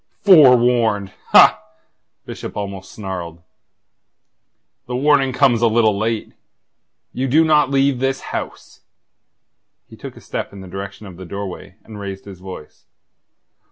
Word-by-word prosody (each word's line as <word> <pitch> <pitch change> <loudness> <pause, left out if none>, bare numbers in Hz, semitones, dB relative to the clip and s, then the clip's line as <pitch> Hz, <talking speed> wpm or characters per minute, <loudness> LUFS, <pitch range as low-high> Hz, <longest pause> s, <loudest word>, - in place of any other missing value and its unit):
"Forewarned? 120 - +4
Ha!" 65 - +6 0.6
Bishop - - -8
almost 100 -2 -6
snarled. 90 -5 -7 1.4
"The 125 - -4
warning 135 0 +2
comes 130 -3 +2
a 120 - +4
little 110 -2 +2
late. 110 +2 -3 0.8
You 130 +1 -2
do 155 +5 +3
not 150 -3 +3
leave 135 -1 +1
this 135 0 -1
house." - - -7 1.1
He - - -15
took - - -10
a - - -13
step - - -5
in 100 - -10
the 95 - -11
direction 95 +3 -8
of 90 -3 -11
the 95 - -9
doorway, 95 0 -8
and 110 -2 -11
raised 100 -1 -7
his 95 -3 -11
voice. 90 -5 -12
110 Hz, 135 wpm, -19 LUFS, 95-130 Hz, 1.4 s, Ha